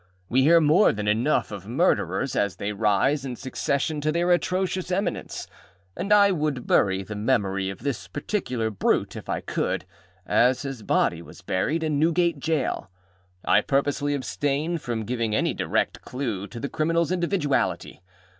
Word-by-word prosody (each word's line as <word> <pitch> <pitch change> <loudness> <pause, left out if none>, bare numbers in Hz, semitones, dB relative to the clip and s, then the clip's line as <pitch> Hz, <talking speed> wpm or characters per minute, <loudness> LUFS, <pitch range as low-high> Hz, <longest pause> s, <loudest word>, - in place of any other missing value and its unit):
We 130 +2 +3
hear 165 +5 +6
more 160 +6 +5
than 105 0 -4
enough 115 +7 +1
of 100 -2 -7
murderers 120 - +1
as 100 -2 0
they 105 +1 -3
rise 110 +7 +2
in 130 -2 -4
succession 140 +3 -2
to 155 +1 +1
their 170 +2 +1
atrocious 185 +1 0
eminence, 195 +3 -2 0.5
and 195 +4 -4
I 205 -1 +6
would 150 -7 -1
bury 95 -1 +2
the 105 - -7
memory 100 -4 0
of 95 +4 -8
this 140 -5 -3
particular 130 - -2
brute, 100 - 0
if - - -9
I - - -1
could, - - -2 0.4
as 125 +6 +3
his 135 -4 -5
body 85 -4 +1
was 85 - -14
buried, 150 - 0
in 150 -2 0
Newgate 170 0 +2
Jail. 145 - -1 0.6
I - - +4
purposely 145 +1 0
abstain 145 +4 -1
from 115 -6 -3
giving 115 -2 -1
any - - +1
direct - - -1
clue 115 -7 -4
to 120 - -9
the 140 - -3
criminalâs 165 +3 0
individuality. 170 - -1
140 Hz, 160 wpm, -25 LUFS, 110-160 Hz, 0.6 s, hear